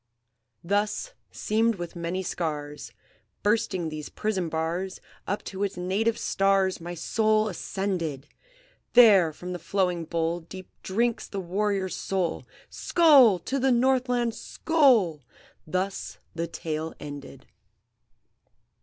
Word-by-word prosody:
"Thus, 205 - -1 0.2
seamed 225 +1 +1
with 175 -2 -7
many 170 +2 -3
scars, 150 -4 -4 0.5
Bursting 205 -6 +1
these 155 -1 -6
prison 195 -6 -2
bars, 165 +4 -2 0.3
Up 205 - -2
to 195 0 -4
its 200 -2 -2
native 205 +6 0
stars 195 -3 +1
My 175 +1 -6
soul 215 +5 +1
ascended! 175 -7 -3 0.7
There 205 -9 +7
from 180 +4 -7
the 180 - -5
flowing 180 -1 0
bowl 165 +1 -1
Deep 185 +2 -11
drinks 230 +4 -1
the 200 - -5
warrior's 195 +1 -1
soul, 185 -4 -2 0.2
Skoal! 280 - +5
to 275 +1 -1
the 265 +1 +3
Northland! 245 -1 +2
skoal!" 245 - +2 0.5
Thus 185 +4 -3 0.2
the 170 0 -3
tale 160 -1 -4
ended. 145 -1 -9
190 Hz, 115 wpm, -26 LUFS, 170-215 Hz, 0.7 s, There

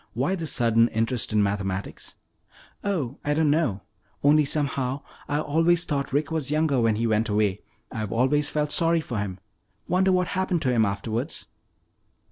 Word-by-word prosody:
"Why 135 +10 0
this 165 -5 -2
sudden 115 -4 +3
interest 115 +1 0
in 105 -1 +3
mathematics?" 100 -1 -3 0.7
"Oh, 150 - -2
I 145 0 0
don't 155 -2 +3
know. 145 - 0 0.4
Only 150 +1 +5
somehow 140 -2 -1 0.2
I 145 - 0
always 165 +3 +2
thought 140 -2 -2
Rick 145 +3 0
was 155 -5 -2
younger 150 -4 +1
when 115 -2 +2
he 115 +2 -1
went 110 0 +1
away. 105 -2 +1 0.3
I've 110 -4 -4
always 130 +5 +2
felt 150 -1 -1
sorry 165 0 +3
for 120 -8 -4
him. 95 -2 -4 0.5
Wonder 185 +2 +2
what 180 -1 +1
happened 185 -3 -1
to 130 - +2
him 115 -2 +3
afterwards?" 110 +8 -3
140 Hz, 165 wpm, -25 LUFS, 110-155 Hz, 0.7 s, Only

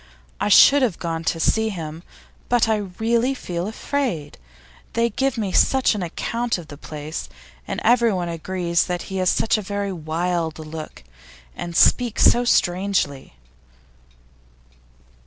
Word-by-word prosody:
I - - 0
should 280 +7 +7
have 230 -10 +1
gone 165 -1 -4
to 165 - 0
see 220 +6 +2
him, 165 -5 -6 0.5
but 240 -2 +3
I 220 -1 +2 0.2
really 235 +4 +1
feel 175 -6 -4
afraid; 220 - -3 0.5
they 230 0 +1
give 270 +3 -1
me 205 -4 -2
such 265 +6 +3
an 210 - -4
account 230 +7 -2
of 170 -3 -11
the 145 - -8
place. 150 +1 -7 0.4
And - - -3
everyone 225 -6 +3
agrees 170 +1 -1
that 180 -1 -3
he - - -2
has 185 -1 +2
such 220 - +1
a - - -4
very 200 0 -3
wild 165 0 -2
look, 155 - -8 0.5
and 170 -1 -6
speaks 240 -3 +4
so 245 +1 +5
strangely. 175 - 0
185 Hz, 140 wpm, -22 LUFS, 165-230 Hz, 0.5 s, should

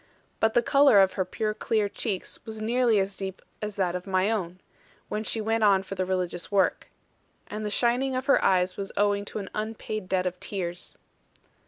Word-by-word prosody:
But 220 0 +2
the 240 - +4
colour 275 -6 +6
of 190 -1 +4
her 190 - 0
pure 215 +2 -2
clear 215 -1 0
cheeks 200 -1 -4
was 220 -1 -6
nearly 235 0 +2
as 195 0 -1
deep 190 -1 -5 0.2
as 210 -1 -4
that 185 -3 0
of 180 +2 -5
my 190 +2 +2
own, 185 -4 -3 0.5
when 215 - -2
she 225 - -1
went 225 +1 0
on 195 -2 +5
for 195 - -7
the 185 -1 -2
religious 180 -1 -2
work. 195 -2 +2 0.6
And 215 +1 -6
the 210 - -2
shining 250 +4 +1
of 255 0 -2
her 275 - +4
eyes 185 -1 +2
was 195 -1 -4
owing 205 0 +2
to - - -6
an 200 -3 -6
unpaid 215 -2 -4
debt 185 -1 +1
of 180 0 -3
tears. 175 -3 -5
205 Hz, 200 wpm, -27 LUFS, 185-220 Hz, 0.6 s, colour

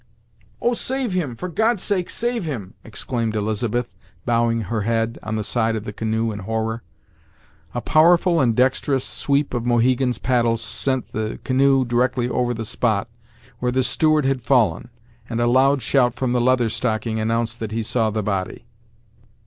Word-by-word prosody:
"Oh! 240 - +1
save 260 -1 -1
him! 155 -10 -2
for 180 - -5
God's 220 +3 +1
sake, 185 -4 -1
save 235 -2 -1
him!" 115 - -5
exclaimed 115 0 -2
Elizabeth, 110 +3 -1 0.3
bowing 115 -1 +1
her 110 +2 -2
head 115 +1 -1
on 110 0 -4
the 110 - -2
side 115 0 0
of 110 - -4
the 105 - -6
canoe 110 +1 -1
in 105 - -6
horror. 110 +3 -2 0.9
A 120 - -1
powerful 170 +3 +4
and 120 -4 +2
dexterous 130 +1 +1
sweep 140 -1 0
of 120 -2 -1
Mohegan's 125 +1 +2
paddle 120 -2 +1
sent 130 +2 -2
the 110 0 -3
canoe 135 0 +3
directly 125 +1 +1
over 125 -1 0
the 115 0 -4
spot 110 -1 0 0.5
where 125 0 0
the 130 +1 +1
steward 155 +3 +2
had 135 -1 0
fallen, 120 -4 +2 0.4
and 115 -1 -2
a 120 - +2
loud 130 +2 +3
shout 125 -3 +2
from 125 0 -1
the 125 -1 +2
Leather 125 -1 +3
Stocking 110 -1 -1
announced 115 +1 -1
that 110 -2 -4
he 115 +1 -2
saw 110 0 0
the 110 0 -2
body. 95 -2 -3
120 Hz, 170 wpm, -22 LUFS, 110-130 Hz, 0.9 s, powerful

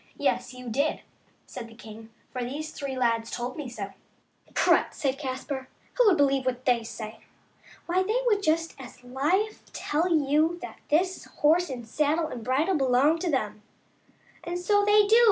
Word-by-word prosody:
Yes, - - 0
you 250 0 -9
did," 280 +7 0 0.4
said 235 - -8
the 225 - -15
king, 220 -1 -11
" - - -37
for 250 -1 -2
these 295 +5 -4
three 275 -3 -5
lads 230 -2 +1
told 245 +1 -4
me 295 -5 -5
so." 200 -4 -6 0.6
"Prut!" - - +3
said 275 -1 -1
Caspar, 265 -1 -4 0.2
"who - - +4
would 380 - +5
believe 275 -2 +3
what 255 -1 -2
they 245 -2 +3
say? 220 -1 -7 0.7
Why, 355 +2 +2
they 430 +5 +1
would 420 -4 +3
just 330 -2 +1
as 250 -1 -11
lief 310 +13 -1
tell 330 +4 0
you 310 +2 +3
that - - -8
this 360 +5 +1
horse 325 +3 +2
and 245 -4 -6
saddle 305 +5 +1
and 240 -6 -6
bridle 295 +9 +2
belong 270 +4 +3
to 355 - -1
them." 215 -7 -1 0.4
" - - -31
And 345 +1 -3
so 410 +3 +2
they 415 0 +5
do 440 +3 +6
280 Hz, 180 wpm, -27 LUFS, 250-335 Hz, 0.7 s, do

